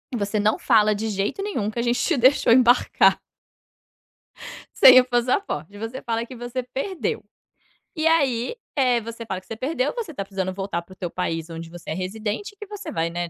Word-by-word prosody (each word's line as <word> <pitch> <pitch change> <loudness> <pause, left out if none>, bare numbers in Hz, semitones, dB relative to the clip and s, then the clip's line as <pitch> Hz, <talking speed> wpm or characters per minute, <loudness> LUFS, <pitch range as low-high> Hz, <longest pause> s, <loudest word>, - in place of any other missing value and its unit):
Você 205 -1 -1
não 215 +1 +2
fala 215 -1 +3
de 220 +2 -3
jeito 200 - -2
nenhum 235 - -2
que 220 - -9
a 235 - 0
gente 245 0 +1
te - - +1
deixou 255 -1 +4
embarcar" 245 0 +4 1.6
"sem 255 0 +9
o - - 0
passaporte, 240 - -1
você 225 +5 -6
fala 230 -1 -2
que 255 0 -10
você 240 +2 -4
perdeu. 275 +9 -4 0.7
E 315 0 -2
aí, 275 - +1 0.2
eh, 250 -4 +2
você 230 +1 -8
fala 185 -3 -4
que - - -27
você 225 - -6
perdeu, 260 - -1
você 445 -10 -5
tá 200 - -4
precisando 190 -1 -3
voltar 195 -2 -3
para 180 +2 -16
o - - -18
teu 175 -2 -5
país 165 -2 -3
onde 165 0 -7
você 175 0 -11
é - - 0
residente 210 - -4
e 410 - -28
que 420 - -9
você 415 0 -7
vai, 165 0 -1
né, 175 0 -4
230 Hz, 205 wpm, -23 LUFS, 195-255 Hz, 1.6 s, sem